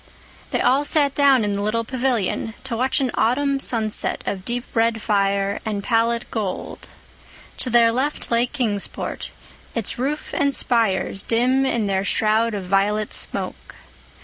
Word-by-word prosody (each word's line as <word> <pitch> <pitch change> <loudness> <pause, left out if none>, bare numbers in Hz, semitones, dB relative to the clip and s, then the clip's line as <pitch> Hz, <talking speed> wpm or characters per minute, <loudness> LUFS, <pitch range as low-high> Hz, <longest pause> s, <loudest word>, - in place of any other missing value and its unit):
They - - 0
all 275 +3 +3
sat 290 -1 +2
down 275 -5 +4
in 205 -1 0
the 200 - -2
little 215 +3 0
pavilion 235 -3 -1
to 265 -3 -3
watch 255 +3 +1
an 260 -3 0
autumn 275 +4 +1
sunset 220 -5 0
of 190 -2 -3
deep 240 +3 -1
red 230 -1 +2
fire 200 -2 +1
and 205 -2 -3
pallid 230 +1 +1
gold. 205 -5 -4 0.7
To 255 - -1
their 235 -1 +5
left 265 +4 -2
lay 235 +1 +3
Kingsport, 225 -7 -3 0.5
its 230 0 0
roofs 290 +4 -3
and 280 -1 +1
spires 200 -4 0
dim 255 +4 +2
in 235 -4 0
their 195 -1 0
shroud 220 +2 +1
of 200 - -4
violet 205 +3 +1
smoke. - - -4
230 Hz, 150 wpm, -22 LUFS, 210-255 Hz, 0.7 s, their